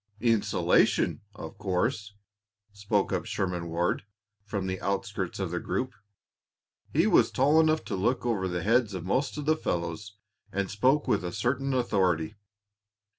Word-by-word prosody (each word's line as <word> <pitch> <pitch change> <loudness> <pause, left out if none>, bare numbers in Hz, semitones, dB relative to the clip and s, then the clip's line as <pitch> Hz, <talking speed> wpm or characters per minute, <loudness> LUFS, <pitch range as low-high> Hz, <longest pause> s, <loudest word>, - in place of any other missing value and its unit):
"Insulation, 115 -1 +2
of 80 - -9
course," 100 +2 -1 0.6
spoke 105 0 0
up - - -2
Sherman 90 -2 -2
Ward, 85 +4 0 0.4
from 100 -2 -3
the 95 0 -3
outskirts 100 -2 -2
of 95 -4 -3
the 90 - -1
group. 130 +7 -2 1.0
He - - +3
was - - +5
tall 145 +5 +3
enough 155 0 +3
to - - -3
look 120 +7 0
over 105 -6 0
the 90 -2 -3
heads 115 -2 +2
of 90 -2 -5
most 130 +11 0
of 150 - -4
the 155 +1 +3
fellows, 90 - -3 0.3
and 100 -1 -2
spoke 130 +8 +2
with 100 - +1
a 90 - -3
certain 135 +7 -1
authority. 95 -9 +1
100 Hz, 150 wpm, -28 LUFS, 90-125 Hz, 1.0 s, was